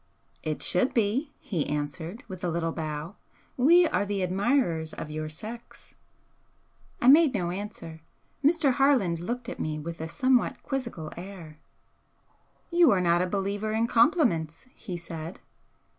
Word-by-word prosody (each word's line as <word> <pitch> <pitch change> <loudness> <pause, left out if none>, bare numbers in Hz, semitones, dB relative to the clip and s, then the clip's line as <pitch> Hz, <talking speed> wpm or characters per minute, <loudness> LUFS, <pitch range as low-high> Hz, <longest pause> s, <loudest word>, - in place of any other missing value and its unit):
"It 155 -1 -3
should 185 +8 +2
be," 235 +7 +1
he 170 -8 -3
answered, 150 - -4
with 185 -1 -9
a 175 - 0
little 165 0 -1
bow 155 +3 -5 0.4
"We 335 +7 +6
are 300 - 0
the 200 -1 -2
admirers 185 - +1
of 150 - -6
your 155 0 -4
sex." 225 +9 -10 1.1
I 240 - +1
made 290 -1 +7
no 175 -3 -1
answer. 180 -5 -7 0.4
Mr. 300 -1 +4
Harland 245 - +3
looked 240 +7 -4
at 255 - -6
me 155 -1 -2
with 165 +2 -6
a 160 - -3
somewhat 255 +8 +1
quizzical 235 - -4
air. 170 -4 -10 1.1
"You 340 -3 +6
are 200 - +4
not 175 -1 +3
a 180 - +1
believer 205 +2 -2
in 225 +1 +2
compliments," 230 - +2
he 185 -6 -7
said. 165 0 -7
190 Hz, 145 wpm, -27 LUFS, 165-245 Hz, 1.1 s, made